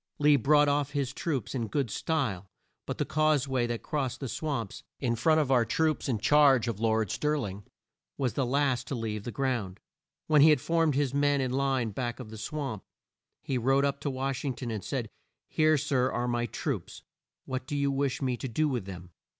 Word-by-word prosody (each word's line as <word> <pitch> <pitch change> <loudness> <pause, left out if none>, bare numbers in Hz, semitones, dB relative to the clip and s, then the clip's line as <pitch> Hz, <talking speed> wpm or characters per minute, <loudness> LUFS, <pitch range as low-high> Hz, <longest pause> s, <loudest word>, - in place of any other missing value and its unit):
Lee 150 0 +5
brought 145 +3 +4
off 145 0 0
his 140 -2 -1
troops 135 - -3
in 120 -4 -2
good 135 -1 -1
style 110 - -2 0.4
by - - -1
the - - -2
cause 155 -2 +2
way 130 -3 0
that 120 -1 -4
crossed 135 -4 -2
the 135 - -4
swamps, 125 -6 -3 0.2
in 120 -3 0
front 155 +7 +3
of 145 -3 0
our 125 -3 +5
troops 155 +4 0
in 120 - +1
charge 135 +1 +4
of 115 -3 -3
Lord 110 -3 +1
Stir 150 0 0
ling, 100 -8 -4
and 100 - -15 0.5
was 130 -3 0
the 135 - 0
last 135 0 +1
to 140 - -3
leave 110 -3 -4
the 120 - -4
ground. 120 -9 -2 0.5
When 150 -2 +5
he 155 - +8
had 150 - +5
formed 165 +1 +1
his 140 -2 0
men 145 0 +2
in 130 -2 -1
line 135 -3 0
back 120 +3 -4
of 115 -4 -8
the 110 - -8
swamp, 135 -4 -4 0.6
he 130 -2 -1
rode 135 +3 +3
up 140 0 -1
to 145 - -2
Wash 135 0 -3
ing 135 -4 -2
ton, 120 -2 -5
and 105 -4 -4
said, 125 0 -3 0.4
"Here, 155 0 +3
sir, 135 -3 +1
are 120 0 -1
my 120 0 0
troops, - - -4 0.4
what 130 0 -4
do 145 - -2
you 140 0 +1
wish 135 -1 -1
me 125 -2 0
to 135 - -4
do 150 +6 +1
with 125 -8 -2
them?" 90 -2 -9
135 Hz, 215 wpm, -29 LUFS, 120-145 Hz, 0.6 s, he